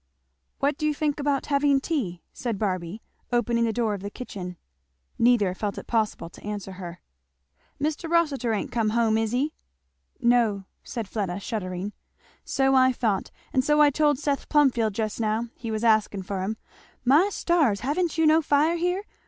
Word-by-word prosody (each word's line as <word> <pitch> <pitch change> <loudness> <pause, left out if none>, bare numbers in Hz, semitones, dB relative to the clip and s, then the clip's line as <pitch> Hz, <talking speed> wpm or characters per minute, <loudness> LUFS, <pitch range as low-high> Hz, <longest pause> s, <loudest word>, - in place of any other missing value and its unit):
"What 285 +1 0
do 305 - +1
you 300 - 0
think 295 0 -1
about 285 -1 0
having 280 -1 +3
tea?" 250 - -3
said 235 -5 -3
Barby 185 0 -3 0.3
opening 235 -1 +2
the 225 - +1
door 220 -1 0
of 200 - -5
the 200 - -5
kitchen. 185 -6 -7 0.6
Neither 230 -6 +4
felt 200 +1 -3
it - - -7
possible 220 -6 -1
to - - -15
answer 205 -2 -5
her. 180 -2 -8 0.8
"Mr. 310 +3 -2
Rossitur 295 -8 +2
ain't 215 - -2
come 225 -3 +1
home, 225 -2 +3
is 220 -1 0
he?" 275 +5 0 0.7
"No," 235 -5 +3 0.2
said 230 -4 -5
Fleda 195 -3 -3
shuddering. 190 -1 -4 0.5
"So 270 0 +1
I 260 -1 +5
thought, 220 -6 -1 0.2
and 260 - +3
so 295 +2 +3
I 295 -1 +6
told 295 0 +2
Seth 285 0 -2
Plumfield 245 -8 +3
just 215 0 -2
now 225 +1 0
he 230 - -6
was 220 0 -2
asking 215 -3 +2
for 190 0 -3
him 215 +4 -2 0.5
My 300 +10 +5
stars! 310 - +2
ha'n't 325 +5 -1
you 325 - +3
no 315 +1 +5
fire 300 +3 +2
here? 360 +3 0
235 Hz, 175 wpm, -26 LUFS, 210-290 Hz, 0.8 s, I